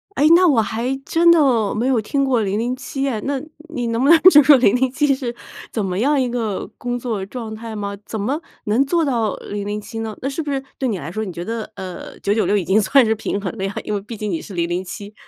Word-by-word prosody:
诶， 295 - +4
那 365 0 +5
我 250 -8 +4
还 235 +5 -2
真 340 +1 +4
的 255 -10 +3
没 235 +4 0
有 245 -4 +2
听 275 +6 0
过 250 -4 +2
007 250 +7 -2
哎， 220 -5 -2
那 275 -1 -2 0.3
你 245 -4 -2
能 230 +2 0
不 280 - +3
能 335 - +9
就 295 -4 +8
说 290 +1 +8
007 260 +4 +2
是 245 -3 -4 0.4
怎 215 - -2
么 185 +1 -2
样 285 +3 +2
一 250 - 0
个 225 -5 -3
工 245 0 -3
作 220 -6 -3
状 225 0 -7
态 225 0 -7
吗？ 200 -1 -4
怎 220 - -5
么 265 +10 -1 0.3
能 230 +7 +2
做 335 +3 +1
到 230 -6 0
007 205 +2 -5
呢？ 220 -2 -4
那 270 - -1
是 305 +4 -3
不 290 - -4
是 270 -1 -1 0.2
对 260 -2 -1
你 200 - -1
来 155 +4 -6
说， 220 +3 -3
你 190 - -5
觉 170 +1 -6
得， 225 -1 -4
呃， 185 -1 -8
996 205 0 +1
已 180 - -1
经 205 +3 +3
算 260 +3 +4
是 220 0 +1
平 205 -1 -3
衡 195 +1 -5
了 190 - -4
呀？ 195 - -3
因 210 - -3
为 200 - -1
毕 220 +2 -8
竟 210 0 -3
你 165 - -2
是 200 - -10
007。 180 +4 -3
230 Hz, 240 characters per minute, -20 LUFS, 205-265 Hz, 0.4 s, 能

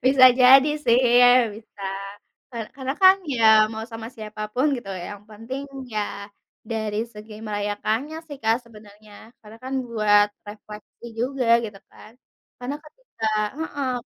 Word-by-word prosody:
Bisa 260 0 +6 0.2
jadi 265 +3 +7
sih, 240 0 +4 0.5
bisa. 215 -2 -14 0.7
Ka 245 - -10 0.2
karena 265 -1 -3
kan 375 0 +8 0.2
ya 230 -2 0 0.3
mau 220 0 -5
sama 225 -2 -8
siapa 215 -1 -7
pun 260 +4 +2
gitu, 220 -5 -8 0.2
yang 205 0 -9
penting, 230 +6 -7 0.3
ya 215 - 0 0.7
dari 215 -2 -2
segi 215 0 -12
merayakannya 215 +7 -2
sih 290 -3 -8
Kak 225 +1 +3
sebenarnya. 210 -2 -17 0.3
Karena 215 +1 -14
kan 260 - -6 0.2
buat 210 -2 +3 0.2
refleksi 210 +2 -12 0.2
juga 255 0 -1 0.2
gitu 210 -3 -8
kan. 215 - -16 0.5
Karena 250 +3 -4
ketika 305 - -8 0.3
heeh. 285 -5 -3
225 Hz, 135 wpm, -23 LUFS, 210-260 Hz, 0.7 s, kan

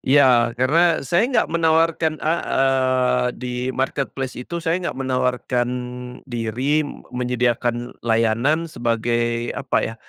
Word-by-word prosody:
Iya, 125 -4 +4
karena 160 +6 +3
saya 175 - +2
enggak 260 - +1
menawarkan 160 -1 +2
a 155 - +2 0.3
eee, 130 -2 +2
di 125 +1 -6 0.2
marketplace 135 0 -2
itu, 125 +8 -6
saya 170 +2 -1
nggak 170 - -4
menawarkan 125 -2 0 0.6
diri, 125 +4 -1
m 145 - -6
menyediakan 120 -1 -1
layanan 115 +8 +1
sebagai 120 -3 -1
apa - - -2
ya, 110 - -5
130 Hz, 120 wpm, -21 LUFS, 120-155 Hz, 0.6 s, Iya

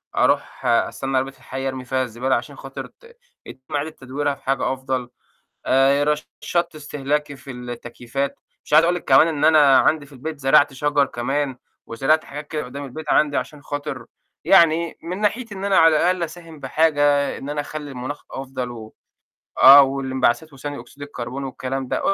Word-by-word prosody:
أروح - - +1
أستنّى 135 +3 +1
عربية 135 +1 -1
الحَي 135 0 -6
أرمي 130 -1 -5
فيها 130 +1 0
الزبالة، 125 +2 -1
عشان - - -5
خاطر - - -8
ت 470 0 -21 0.3
يتم 130 +4 -9
إعادة 145 +2 -1
تدويرها 140 0 -3
في - - -25
حاجة 135 0 0
أفضل، 130 -2 -3 0.6
آآ 135 +2 +4
رشّدت 150 +3 -2
استهلاكي 145 0 -3
في 135 0 -10
التكييفات، 125 +2 -5 0.3
مش - - -6
عايزة 160 +2 +7
أقول 175 - +2
لِك 175 - -6
كمان 135 +4 +6
إن 150 -2 0
أنا 150 -4 +6
عندي 155 -2 +2
في 140 - -17
البيت 150 +3 -7
زرعت 140 +1 +4
شجر 145 +1 +1
كمان، 135 +2 -2 0.3
وزرعت 135 +7 +1
حاجات 150 +1 -8
كده 155 -1 -3
قُدّام 140 +3 -7
البيت 155 +4 -8
عندي 145 -2 +3
عشان 145 +3 -5
خاطر 145 -4 -5 0.4
يعني 170 -3 +4
من 180 +3 -4
ناحيتي 215 +1 -1
إن 195 +1 -5
أنا 195 -1 +3
على 165 -1 +6
الأقل 180 +1 +1
أساهم 165 -1 -9
بحاجة، 145 0 +2
إن 140 - -7
أنا 145 0 -2
أخلّي 145 0 -7
المناخ 130 +3 -6
أفضل 130 -2 -5
و 110 -2 -10 0.7
آه، 140 +2 +11
واللإنبعثات 135 +2 0
وثاني 145 +1 -6
أوكسيد 125 +4 -11
الكربون، 130 -1 -6
والكلام 130 0 -4
ده، - - -1
140 Hz, 175 wpm, -22 LUFS, 130-155 Hz, 0.7 s, آه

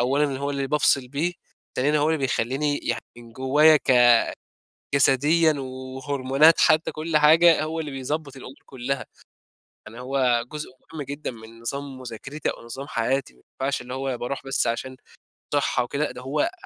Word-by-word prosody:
أولًا 135 +2 +1
هو 140 +1 -2
اللي 140 -1 -2
بافصل 135 -3 +2
بيه، 155 +6 -1 0.4
ثانيًا 150 +4 +2
هو 150 +2 +2
اللي 160 -1 +1
بيخلّيني 135 +3 -1
يع 115 - -1 0.2
من 115 -1 -13
جوّايا 145 +5 +5
ك 125 -4 +5 0.8
جسديًا 150 +4 +4
و 140 -2 -5 0.3
وهرمونات 140 +3 +3
حتى، 155 +1 +3
كل 155 0 -2
حاجة، 160 +2 +6
هو 160 +1 -3
اللي 150 -2 -5
بيضبّط 140 +1 -4
الأمور 130 0 -10
كلّها، 130 +1 -4 0.8
يعني 115 +3 -11
هو 125 -2 +1
جزء 150 -2 -6 0.2
مهم 155 - -5
جدًا 145 +1 -5
من 115 0 -13
نظام 135 +2 -5
مذاكرتي 130 +5 -5
أو - - -7
نظام 135 +4 -7
حياتي، 125 - -1
ما 60 - -25 0.2
ينفعش 135 -1 -1
اللي 125 +1 -8
هو 135 -1 -3
باروح 130 +4 -4
بس 135 -3 0
عشان 130 +3 -3 0.6
صحَّة 140 -3 +1
وكده، 140 +5 -2
لأ، - - -3
ده - - -10
هو 150 - 0
135 Hz, 170 wpm, -24 LUFS, 125-150 Hz, 0.8 s, حاجة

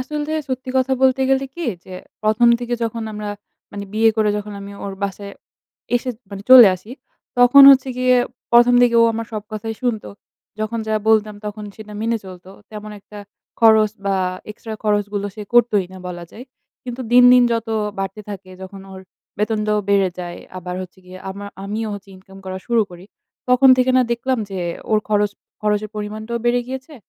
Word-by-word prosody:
আসলতে 300 +3 -4 0.2
সত্যি 260 0 -4
কথা 260 0 +1
বলতে 265 0 +3
গেলে 270 0 +2
কি? 345 - -5 0.2
যে 185 - -10 0.3
প্রথম 220 +3 +3
দিকে 240 0 -3
যখন 230 0 -4
আমরা 210 0 -6 0.4
মানে 200 0 -6
বিয়ে 225 +1 +4
করে 215 -1 +2
যখন 210 0 -6
আমি 200 0 -9
ওর 200 - -5
বাসায় 200 0 -4 0.6
এসে 250 +1 0 0.2
মানে 200 0 -7
চলে 245 -5 +11
আসি। 195 +5 -13 0.5
তখন 245 +3 +8
হচ্ছে 270 0 +4
গিয়ে 255 0 +3 0.4
প্রথম 240 +1 +6
দিকে 240 -1 +3
ও - - +6
আমার 230 0 -4
সব 215 -2 -4
কথাই 220 +1 -4
শুনতো। 235 -4 -2 0.5
যখন 225 +2 -2
যা 220 - 0
বলতাম, 215 -1 +3
তখন 210 0 -6
সেটা 215 -1 -11
মেনে 230 +1 0
চলত। 180 -1 -12 0.2
তেমন 215 0 -8
একটা 205 +1 -13 0.4
খরচ 220 -2 +5 0.2
বা, 195 -1 +1 0.3
এক্সট্রা 220 +1 -8
খরচ 205 -1 +2
গুলো 205 0 -2
সে 215 - -7
করতই 220 -5 +4
না 190 - -10
বলা 175 -1 -7
যায়। 245 - -11 0.4
কিন্তু 250 0 -6
দিন, 250 0 +7
দিন 250 0 +6
যত 230 -1 -2 0.3
বাড়তে 195 +2 -4
থাকে 195 -1 -9
যখন 195 +1 -10
ওর 190 - -9 0.4
বেতনটাও 210 0 0
বেড়ে 200 -2 +3
যায়, 175 -1 -6 0.2
আবার 180 0 -6
হচ্ছে 185 0 -12
গিয়ে 185 0 -11
আমার, 200 +1 -8 0.2
আমিও 215 +2 -3
হচ্ছে 200 0 -11
ইনকাম 190 +1 -16
করা 185 0 -5
শুরু 235 -2 +2
করি। 175 +1 -12 0.4
তখন 250 +1 +5
থেকে 255 0 +2
না 255 - +5
দেখলাম 255 +2 -1
যে, 190 - -5 0.3
ওর 215 - +4
খরচ 210 -1 +2 0.3
খরচের 210 0 -1
পরিমাণটাও 215 +2 -4
বেড়ে 245 0 +2
গিয়েছে। 265 +3 -7
215 Hz, 185 wpm, -20 LUFS, 200-240 Hz, 0.6 s, চলে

